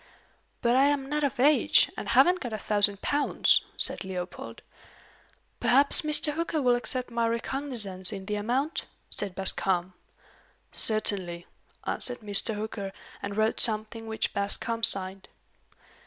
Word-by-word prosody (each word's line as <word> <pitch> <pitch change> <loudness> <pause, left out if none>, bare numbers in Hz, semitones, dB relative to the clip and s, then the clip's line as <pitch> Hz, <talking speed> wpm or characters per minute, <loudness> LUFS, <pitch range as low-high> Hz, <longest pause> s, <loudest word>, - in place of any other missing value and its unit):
"But 235 +1 +2
I 270 +2 +4
am 285 -1 0
not 300 +1 -2
of 275 -3 -2
age, 290 +3 +4
and - - -6
haven't 360 +1 +4
got 245 -7 -6
a - - -2
thousand 205 -1 0
pounds," 290 0 +2 0.2
said - - +2
Leopold. 185 -1 -7 1.0
"Perhaps 280 +6 +5
Mr. 300 -1 +3
Hooker 330 0 -2
will 250 -3 +2
accept 245 +1 -2
my 235 -1 0
recognizance 230 -6 -2
in 195 -2 -7
the 210 - -4
amount?" 245 +9 -2 0.3
said 200 -3 -5
Bascombe. 185 -1 0 0.8
"Certainly," 190 -5 -1 0.4
answered 245 -1 -3
Mr. 210 +1 +2
Hooker, 205 -2 -5 0.3
and 200 0 -6
wrote 220 +1 0
something, 220 0 +3
which 220 0 -2
Bascombe 225 +3 -1
signed. 190 0 -1
220 Hz, 135 wpm, -27 LUFS, 200-270 Hz, 1.0 s, Perhaps